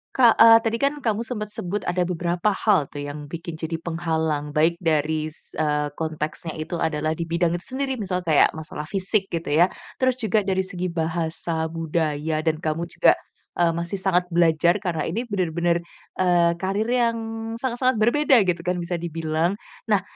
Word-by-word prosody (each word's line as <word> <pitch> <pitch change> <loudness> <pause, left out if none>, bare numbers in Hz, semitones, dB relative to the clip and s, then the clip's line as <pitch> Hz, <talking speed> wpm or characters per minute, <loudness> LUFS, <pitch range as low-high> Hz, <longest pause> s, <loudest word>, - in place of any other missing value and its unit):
Kak, 240 -3 +6
e 225 - +10 0.2
tadi 225 +1 +1
kan 280 +1 +3
kamu 220 0 +1
sempet 210 -3 -4
sebut 195 +1 -3
ada 175 0 +1
beberapa 175 +3 0
hal 190 -10 +3
tuh 145 - -6
yang 145 +1 -7
bikin 170 -1 -6
jadi 160 0 -3
penghalang, 160 -3 -2
baik 160 +3 +3
dari 155 0 +1
s - - -15
eee, 150 -1 +1
konteksnya 155 0 -3
itu 155 +3 -4
adalah 155 -1 0
di 170 - -2
bidang 170 0 +1
itu 175 - -5
sendiri, 270 -1 -1
misal 185 -3 -1
kayak 155 -3 +5
masalah 150 -1 -6
fisik 195 +1 0
gitu 165 0 -3
ya. 165 +4 +6 0.4
Terus 255 -1 +3
juga 215 -1 +1
dari 190 -1 +1
segi 180 -1 -4
bahasa, 160 0 -2
budaya, 160 -1 -1
dan 160 -1 +1
kamu 160 +2 -1
juga, - - +5 0.5
eee, 170 -1 +4
masih 170 +3 -3
sangat 180 -2 +2
belajar, 170 +1 +4
karena 165 -5 -1
ini 200 +8 -1
benar-benar, 170 -3 +1 0.4
eee, 175 -2 +4
karir 200 +4 -1
yang 240 -2 +2 0.4
sangat 255 -2 -2
sangat 255 -1 +3
berbeda 260 +1 +5
gitu 170 -1 0
kan, 180 0 0
bisa 175 +1 -2
dibilang. 165 +1 -1 0.4
Nah, 205 -3 +3
170 Hz, 175 wpm, -23 LUFS, 160-195 Hz, 0.5 s, e